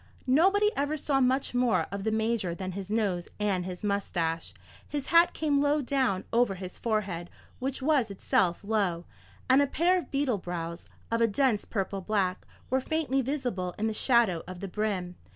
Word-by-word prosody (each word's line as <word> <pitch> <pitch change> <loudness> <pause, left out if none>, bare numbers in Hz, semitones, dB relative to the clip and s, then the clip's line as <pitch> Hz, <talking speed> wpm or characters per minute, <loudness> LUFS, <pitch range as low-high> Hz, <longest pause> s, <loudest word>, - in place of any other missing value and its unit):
Nobody 385 +10 +4
ever 290 +2 0
saw 280 -2 +1
much 260 +1 +1
more 235 -10 +2
of 200 0 -4
the 220 - +1
Major 220 -5 0
than 185 0 -4
his 195 +1 -6
nose 200 -5 0
and 195 -4 0
his 180 +1 -7
moustache. 170 -5 -1 0.4
His 290 -2 -3
hat 335 +1 +6
came 290 -3 +1
low 290 +1 +3
down 255 -8 0
over 235 -4 +3
his 185 -1 -8
forehead, 200 -7 -2 0.3
which 270 +1 -3
was 280 -6 +3
itself 190 -2 0
low, 200 -5 0 0.4
and 260 +2 +6
a 285 - +3
pair 355 +6 +2
of - - -9
beetle 275 -6 0
brows, 170 -1 -5 0.2
of 230 0 +1
a 230 - +5
dense 225 0 +1
purple 195 -2 -3
black, 190 -2 -1 0.2
were 260 0 +2
faintly 290 -2 0
visible 245 - -2
in 215 - -1
the 220 - 0
shadow 220 -7 +3
of 185 -1 -7
the 195 - -5
brim. 185 -3 -2
215 Hz, 180 wpm, -29 LUFS, 185-270 Hz, 0.4 s, hat